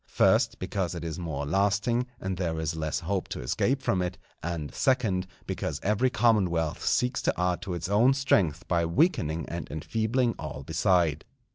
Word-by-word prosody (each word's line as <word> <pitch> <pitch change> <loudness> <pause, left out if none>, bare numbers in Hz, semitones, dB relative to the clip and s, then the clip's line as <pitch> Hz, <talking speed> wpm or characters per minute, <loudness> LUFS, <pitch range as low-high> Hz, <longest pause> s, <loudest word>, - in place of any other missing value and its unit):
First, - - +3
because 90 -3 -2
it 85 - -5
is 80 +1 -4
more 75 -5 -3
lasting, 100 - +1
and 95 0 -3
there 85 -3 -2
is 80 0 -2
less 80 0 -2
hope 95 +2 -2
to - - -5
escape 130 - 0
from 90 - +1
it; 90 -1 -3 0.2
and, 85 -3 -4
second, 105 -9 +1 0.2
because - - -3
every 105 +5 +2
commonwealth 95 -11 +1
seeks 125 +1 +1
to - - 0
add 90 0 +1
to 90 - -4
its 85 -1 -3
own 115 +7 +4
strength 95 - +1
by 85 -1 +2
weakening 85 - +1
and 85 -1 -5
enfeebling 115 - 0
all 75 -2 -6
beside. 80 -1 +2
90 Hz, 170 wpm, -28 LUFS, 80-110 Hz, 0.2 s, own